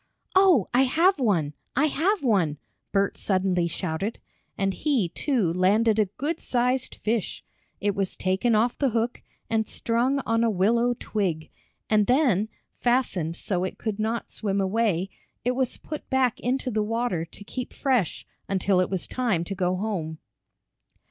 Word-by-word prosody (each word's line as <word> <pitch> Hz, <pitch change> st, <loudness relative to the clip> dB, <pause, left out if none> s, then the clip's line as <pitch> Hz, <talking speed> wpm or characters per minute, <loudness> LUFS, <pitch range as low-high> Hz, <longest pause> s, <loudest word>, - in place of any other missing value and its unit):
"Oh, 370 Hz, -, +5 dB
I 250 Hz, -, +5 dB
have 330 Hz, +6 st, +3 dB
one! 175 Hz, -, +1 dB, 0.2 s
I 280 Hz, +5 st, +4 dB
have 340 Hz, +5 st, +1 dB
one!" 185 Hz, -, +2 dB, 0.3 s
Bert 200 Hz, 0 st, +1 dB
suddenly 185 Hz, -3 st, +1 dB
shouted, 180 Hz, +5 st, -3 dB, 0.4 s
and 195 Hz, -1 st, +1 dB
he, 250 Hz, -, +1 dB
too, 220 Hz, -, 0 dB
landed 210 Hz, +5 st, +3 dB
a 210 Hz, -, +3 dB
good 290 Hz, -, -3 dB
sized 250 Hz, +1 st, 0 dB
fish. 220 Hz, -2 st, -2 dB, 0.4 s
It 205 Hz, +1 st, +1 dB
was 195 Hz, -1 st, -2 dB
taken 190 Hz, +5 st, +1 dB
off 235 Hz, +3 st, +2 dB
the 275 Hz, -, +1 dB
hook, 235 Hz, +1 st, -1 dB, 0.3 s
and 220 Hz, -1 st, 0 dB
strung 240 Hz, +4 st, 0 dB
on 230 Hz, 0 st, +2 dB
a 230 Hz, -, +3 dB
willow 235 Hz, +5 st, +2 dB
twig, 175 Hz, -7 st, -2 dB, 0.4 s
and 210 Hz, -1 st, +3 dB
then, 245 Hz, -, +3 dB, 0.3 s
fastened 225 Hz, -10 st, +1 dB
so 180 Hz, 0 st, -2 dB
it 185 Hz, -, -4 dB
could 215 Hz, -2 st, -3 dB
not 225 Hz, +2 st, -2 dB
swim 200 Hz, -2 st, -1 dB
away, 195 Hz, -2 st, +1 dB, 0.3 s
it 250 Hz, -, +3 dB
was 255 Hz, 0 st, -1 dB
put 305 Hz, -2 st, -7 dB
back 260 Hz, -3 st, +2 dB
into 255 Hz, +1 st, -1 dB
the 215 Hz, -1 st, +1 dB
water 225 Hz, -5 st, -1 dB
to 170 Hz, +5 st, -12 dB
keep 250 Hz, +4 st, -5 dB
fresh 255 Hz, -, 0 dB, 0.2 s
until 195 Hz, -1 st, +2 dB
it 185 Hz, -, +1 dB
was 190 Hz, -3 st, -2 dB
time 230 Hz, -10 st, 0 dB
to 185 Hz, -, -5 dB
go 180 Hz, -1 st, 0 dB
home. 180 Hz, -6 st, -3 dB
220 Hz, 160 wpm, -26 LUFS, 190-250 Hz, 0.4 s, Oh